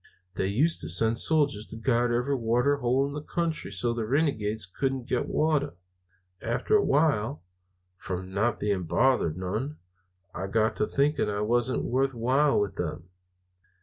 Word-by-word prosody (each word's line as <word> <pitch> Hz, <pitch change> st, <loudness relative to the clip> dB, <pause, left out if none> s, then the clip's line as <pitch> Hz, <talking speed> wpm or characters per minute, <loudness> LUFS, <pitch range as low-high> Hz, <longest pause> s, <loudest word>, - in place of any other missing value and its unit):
They 95 Hz, -, -1 dB
used 140 Hz, +12 st, +1 dB
to 75 Hz, -, -2 dB
send 110 Hz, +6 st, +3 dB
soldiers 145 Hz, -9 st, +2 dB
to -, -, -7 dB
guard 120 Hz, +1 st, +1 dB
every 125 Hz, +4 st, 0 dB
water 125 Hz, +3 st, +1 dB
hole 130 Hz, +1 st, +1 dB
in 140 Hz, -, -5 dB
the 150 Hz, -, -5 dB
country 165 Hz, -, -3 dB
so 110 Hz, +5 st, -1 dB
the 115 Hz, -1 st, -3 dB
renegades 110 Hz, -, 0 dB
couldn't 130 Hz, +6 st, -3 dB
get 125 Hz, -1 st, -1 dB
water. 150 Hz, -, 0 dB, 0.7 s
After 120 Hz, -, 0 dB
a 205 Hz, -, +4 dB
while, 140 Hz, -, +1 dB, 0.6 s
from 95 Hz, 0 st, -6 dB
not 110 Hz, +3 st, 0 dB
being 100 Hz, -4 st, -1 dB
bothered 85 Hz, -2 st, +2 dB
none, 110 Hz, +11 st, -3 dB, 0.6 s
I 95 Hz, -, -4 dB
got 110 Hz, +2 st, +1 dB
to 105 Hz, -, 0 dB
thinking 140 Hz, -5 st, +1 dB
I 105 Hz, 0 st, -2 dB
wasn't 120 Hz, +4 st, +1 dB
worth 135 Hz, +1 st, 0 dB
while 135 Hz, +5 st, +2 dB
with 100 Hz, -3 st, -2 dB
them. 85 Hz, +1 st, -4 dB
120 Hz, 160 wpm, -27 LUFS, 105-140 Hz, 0.7 s, a